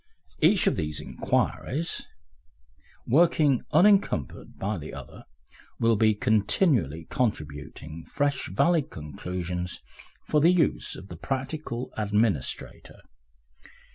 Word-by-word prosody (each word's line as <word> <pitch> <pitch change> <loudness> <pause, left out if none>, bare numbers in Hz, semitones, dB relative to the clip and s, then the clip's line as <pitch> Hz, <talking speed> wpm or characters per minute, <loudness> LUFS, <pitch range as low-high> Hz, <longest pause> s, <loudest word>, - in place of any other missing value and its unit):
Each - - +5
of - - +2
these 75 -1 -3
inquiries, 160 +5 -1 1.0
working 150 -2 +4
unencumbered 180 - +2
by 100 -1 -2
the 75 - -8
other, - - -11 0.5
will 115 0 +4
be 110 0 +3
continually 105 - +2
contributing 75 - -3
fresh 140 -2 -1
valid 160 - +2
conclusions 90 +3 -5 0.5
for 150 - +3
the 165 - +6
use 180 -3 +1
of 95 - -11
the 85 - -8
practical 135 - -4
administrator. 105 - -1
110 Hz, 100 wpm, -27 LUFS, -, 1.0 s, the